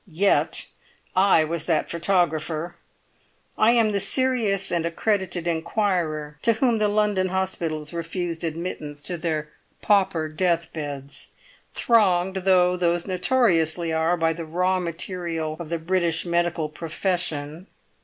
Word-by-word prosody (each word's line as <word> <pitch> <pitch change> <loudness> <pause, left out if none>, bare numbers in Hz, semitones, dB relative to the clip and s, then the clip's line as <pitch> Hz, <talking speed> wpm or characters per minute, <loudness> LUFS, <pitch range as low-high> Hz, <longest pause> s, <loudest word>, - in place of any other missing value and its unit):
Yet 190 +3 +1 0.5
I 185 -4 +5
was 160 0 -3
that 165 -3 0
photographer. 170 -2 0 0.8
I 225 +2 +4
am 230 -3 +3
the 200 - 0
serious 230 -5 +1
and 170 -1 0
accredited 175 0 -1
inquirer 160 -4 -1
to 230 - +4
whom 230 0 +1
the 210 - +3
London 205 -2 +1
hospitals 175 -5 -2
refused 170 0 -3
admittance 155 -3 -5
to 180 - -2
their 155 -2 -2 0.3
pauper 190 -6 +2
deathbeds, 155 -4 -3 0.5
thronged 190 -5 +3
though 180 -1 +3
those 175 -1 0
notoriously 180 - +1
are 160 +2 +1
by 165 -1 +1
the 165 +1 -6
raw 180 +3 0
material 170 -2 -3
of 170 -3 -7
the 170 - -1
British 170 0 0
medical 170 -2 0
profession. 165 0 -3
175 Hz, 125 wpm, -24 LUFS, 160-190 Hz, 0.8 s, I